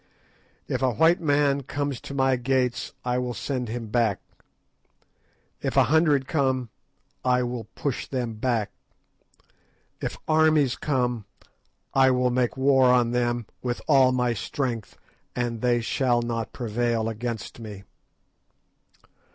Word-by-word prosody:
If - - -2
a 130 -2 +2
white 165 +7 +4
man 145 -2 +2
comes 140 0 -3
to 140 - -8
my 135 -1 +3
gates 125 0 0
I 125 0 +1
will 125 -1 -3
send 125 +3 -3
him 115 -1 -5
back; 110 -4 +1 1.4
if - - -2
a - - +7
hundred 150 -5 +3
come 130 -5 0 0.5
I 125 0 +2
will 120 -1 -4
push 140 -4 -3
them 125 -4 -3
back; 110 -1 -1 1.3
if - - -3
armies 155 -4 +4
come, 125 -6 -1 0.7
I 135 -1 +5
will 125 -1 +2
make 125 +1 0
war 130 -1 +5
on 120 -2 +3
them 120 -1 0 0.2
with 120 -1 -2
all 130 -2 +5
my 125 -1 +1
strength, 115 0 -4 0.4
and 120 -2 -2
they 120 -1 +2
shall 120 0 +1
not 115 -1 -3
prevail 115 -1 -1
against 115 0 -5
me. 105 -4 -8
125 Hz, 130 wpm, -25 LUFS, 120-135 Hz, 1.4 s, a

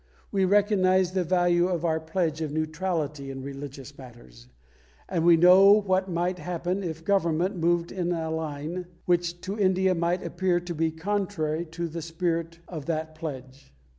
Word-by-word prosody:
We 195 -1 +2
recognise 190 -2 +3
the 185 -1 0
value 175 0 +2
of 175 -2 -2
our 160 -1 +1
pledge 160 -1 -2
of 155 -2 -2
neutrality 155 -2 -2
in 135 -1 -6
religious 140 0 -8
matters, 65 - -14 0.6
and 170 -4 -1
we 170 -1 +6
know 185 +4 +8
what 190 -2 +1
might 175 +1 -1
happen 180 +2 -3
if 165 -3 -5
Government 185 -1 +1
moved 170 0 +1
in 180 -2 -2
a 160 -2 -2
line 160 +3 -4 0.2
which 175 0 0
to 195 +3 -5
India 190 -1 +3
might 175 +1 0
appear 180 0 0
to 175 0 -6
be 165 0 0
contrary 170 -2 -2
to 170 +2 -4
the 165 +1 -6
spirit 165 0 -2
of 155 -5 -7
that 160 -1 -2
pledge. 135 -4 -8
170 Hz, 165 wpm, -26 LUFS, 155-185 Hz, 0.6 s, know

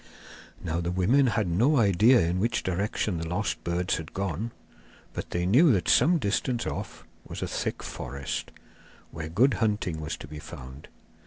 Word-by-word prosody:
Now 85 +1 -1
the 85 - -2
women 105 +10 +3
had 110 -4 +1
no 120 - +3
idea 110 +3 +5
in 85 +2 0
which 115 +3 0
direction 95 0 -1
the 85 - -4
lost 90 +4 -2
birds 90 +2 0
had 80 -1 -9
gone, 100 +3 -2 0.6
but - - -5
they 90 0 -1
knew 135 - +6
that 90 -5 0
some 175 +1 +5
distance 120 0 -1
off - - -5 0.2
was - - -6
a - - -2
thick - - -3
forest, 70 0 -5 0.6
where 80 -1 -6
good 120 +11 +3
hunting 105 -7 0
was 75 +1 -4
to - - -9
be 75 +1 -8
found. 65 -1 -10
95 Hz, 170 wpm, -27 LUFS, 85-115 Hz, 0.6 s, knew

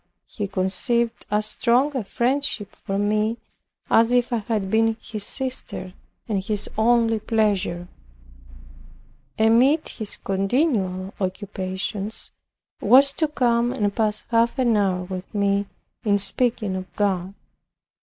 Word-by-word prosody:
He 205 -2 -5
conceived 200 +5 -1
as 210 0 +1
strong 255 +6 +1
a 255 - -1
friendship 240 -1 -1
for 195 -2 -4
me 215 +2 0 0.5
as 230 +1 +4
if 245 0 +2
I - - +2
had 210 -3 -2
been 225 0 +2
his 215 -2 -6
sister; 255 -7 +1 0.3
and 200 -4 -1
his 210 0 0
only 225 0 +3
pleasure, 205 -5 0 1.5
amid 245 +8 +4
his 215 -3 -4
continual 195 - -1
occupations, 190 +2 -4 0.5
was 275 +2 +6
to 315 +2 0
come 240 -4 +1
and 210 -6 -1
pass 215 -2 0
half 230 +3 +2
an 240 -4 +2
hour 190 -3 +1
with 185 0 -7
me 200 0 +1 0.4
in 205 -3 +3
speaking 205 0 0
of 185 0 -6
God. 195 -2 -1
215 Hz, 125 wpm, -23 LUFS, 195-235 Hz, 1.5 s, was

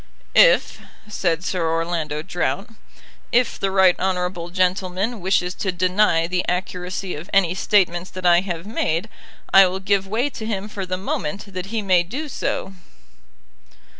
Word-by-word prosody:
"If," - - +5 0.3
said 180 -5 -1
Sir 180 -3 -1
Orlando 165 -2 -2
Drought, 190 +4 -2 0.6
"if 245 +1 +2
the 195 - 0
right 190 -2 +5
honourable 180 -2 -2
gentleman 185 +4 -1
wishes 180 -1 +1
to 190 - -2
deny 180 -1 +2
the 180 +1 -1
accuracy 180 +1 -3
of 155 +4 -8
any 190 -4 +3
statements 185 -2 +1
that 185 -1 -8
I 175 0 +6
have 175 -3 -5
made, 175 -6 -1 0.4
I 195 -1 +8
will 185 +1 -3
give 195 0 0
way 235 +8 -1
to 220 - -7
him 205 -2 -3
for 195 -3 -6
the 185 0 -2
moment, 195 +1 -4
that 185 +1 -5
he 220 +1 -3
may 185 -3 +4
do 270 - -5
so." 195 -6 -3
185 Hz, 155 wpm, -22 LUFS, 175-195 Hz, 0.6 s, I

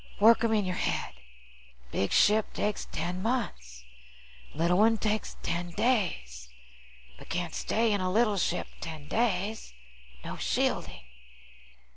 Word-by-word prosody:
Work 225 +2 +6
'em 230 - +2
in 210 -3 +2
your 185 - -1
head. - - -1 0.8
Big 100 - -1
ship 215 +1 +4
takes 210 0 -2
ten 180 +1 -3
months, 65 - -3 0.7
little 170 +4 +2
one 225 +1 +5
takes 215 0 -2
ten 175 +1 -2
days. 170 - -1 0.7
But - - -13
can't 175 -1 -2
stay 225 0 +1
in 200 - 0
a 185 0 0
little 215 0 +3
ship 180 - 0
ten 155 -3 -7
days. 210 - -1 0.5
No - - -5
shielding. - - -1
200 Hz, 130 wpm, -29 LUFS, 170-220 Hz, 0.8 s, Work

